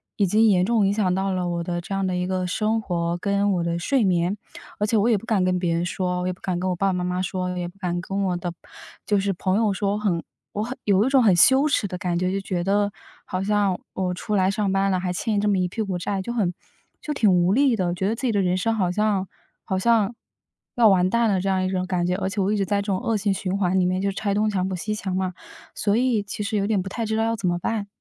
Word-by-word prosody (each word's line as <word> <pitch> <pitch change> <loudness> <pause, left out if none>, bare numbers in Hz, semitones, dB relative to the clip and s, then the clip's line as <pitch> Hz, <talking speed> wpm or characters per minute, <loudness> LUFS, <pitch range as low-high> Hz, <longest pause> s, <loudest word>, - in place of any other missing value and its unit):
已 205 - +2
经 215 +4 +4
严 185 -4 +4
重 220 -2 +2
影 200 - +1
响 200 -4 +1
到 190 +1 0
了 180 -1 -1
我 170 0 -2
的 175 0 -3
这 185 - -6
样 195 -1 0
的 185 - -1
一 180 0 -1
个 185 0 -1
生 215 +4 0
活， 170 -3 -2
跟 200 +2 +1
我 175 -2 0
的 170 0 -1
睡 245 +8 +1
眠。 180 +1 +1 0.4
而 210 - +1
且 225 - +1
我 210 +3 +3
也 225 - +4
不 200 - -9
敢 215 -5 +1
跟 185 0 +1
别 170 -2 0
人 170 +1 0
说， 180 0 -2
我 180 - -2
也 185 - 0
不 180 - -18
敢 185 -2 -2
跟 185 - -1
我 180 - 0
爸 195 - +1
爸 190 - +1
妈 180 0 -2
妈 180 0 -1
说， 185 0 -2
我 180 - -4
也 175 -1 -3
不 180 - -13
敢 175 -2 -2
跟 195 +2 -2
我 180 -2 0
的 175 0 -4 0.5
就 205 -1 +2
是 195 0 0
朋 185 +2 0
友 215 -3 +2
说， 200 +1 -1
很 185 -6 0 0.3
我 210 - -2
很 250 +4 -5
有 200 0 +4
一 265 - +1
种 270 -1 +5
很 195 -5 +5
羞 265 - +6
耻 215 - +1
的 180 - -5
感 180 -2 -1
觉， 185 +1 0
就 195 - -1
觉 180 -2 -2
得 200 +2 +1 0.3
好 185 +1 -3
像 200 -2 +1
我 185 -1 -1
出 210 +3 -3
来 190 -1 +3
上 205 -1 -1
班 195 0 +2
了， 185 - +1
还 180 0 -2
欠 210 +3 -1
这 210 - +1
么 200 - +2
一 180 -1 +1
屁 220 +5 -4
股 195 -4 -2
债， 195 +2 -2
就 235 - -5
很 200 -7 0 0.5
就 305 - -5
挺 220 -8 +3
无 180 +1 +3
力 265 0 +3
的。 185 -4 -1
我 175 - 0
觉 190 +2 -1
得 220 - 0
自 255 +3 -2
己 235 - +2
的 205 - +1
人 180 -1 +1
生 225 +5 0
好 185 -5 +1
像 205 -1 0 0.4
好 190 - -2
像 225 +1 +2 0.6
要 235 -2 +5
完 185 -1 +3
蛋 235 +2 +2
了 190 -3 +1
这 195 - -1
样 190 -1 +1
一 - - -1
种 185 -1 -1
感 180 -2 0
觉， 180 - 0
而 190 -1 -2
且 200 - -4
我 195 +2 +1
一 - - 0
直 200 - 0
在 205 - +1
这 - - -7
种 190 -2 0
恶 225 +2 0
性 200 -1 0
循 190 0 -2
环 190 -1 +1
里 180 - +2
面 185 +1 0
就 200 0 0
是 - - -11
拆 205 -1 -1
东 215 +1 +2
墙 190 -3 -1
补 190 - -2
西 210 +4 -3
墙 190 -3 -3
嘛， 185 -1 -1 0.4
所 205 0 +1
以 245 -3 +2
其 205 +1 -5
实 215 +2 -2
有 200 0 0
点 215 -2 +1
不 190 - -7
太 230 +4 -3
知 220 0 -1
道 225 - +2
要 230 0 0
怎 200 -4 -3
么 175 0 +1
办。 210 +1 -2
195 Hz, 325 characters per minute, -23 LUFS, 180-210 Hz, 0.6 s, 羞